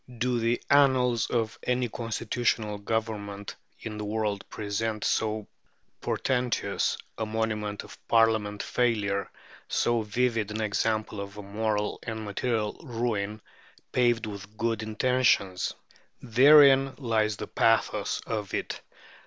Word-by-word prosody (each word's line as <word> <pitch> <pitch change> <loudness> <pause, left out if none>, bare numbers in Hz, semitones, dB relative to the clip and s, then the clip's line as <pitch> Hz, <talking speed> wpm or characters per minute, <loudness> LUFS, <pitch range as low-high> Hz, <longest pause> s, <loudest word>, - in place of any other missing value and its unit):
Do 125 +1 +1
the 115 +1 +1
annals 130 -4 +4
of 115 -3 -1
any 125 0 0
constitutional 115 -2 -1
Government 100 -2 -3 0.3
in 110 -1 -6
the - - -3
world 105 -1 -1
present 110 +1 -3
so 110 -1 0 0.5
portentous 125 -2 0 0.2
a 110 - 0
monument 110 -2 -2
of - - -13
Parliamentary 110 -3 +2 0.3
failure, 100 -2 -2 0.4
so 120 -1 +1
vivid 110 0 0
an 105 +1 -4
example 110 0 -1
of 100 +1 -8
a 105 - -7
moral 105 +1 -1
and 110 -2 -5
material 105 +1 -2
ruin 110 -5 -2 0.5
"paved 120 -2 +2
with 105 0 -8
good 115 -1 0
intentions"? 110 -4 +1 0.4
Therein 135 +2 +6
lies 110 -5 0
the 105 - -4
pathos 115 +2 +1
of 105 -3 -3
it. - - -4
110 Hz, 120 wpm, -28 LUFS, 105-120 Hz, 0.5 s, Therein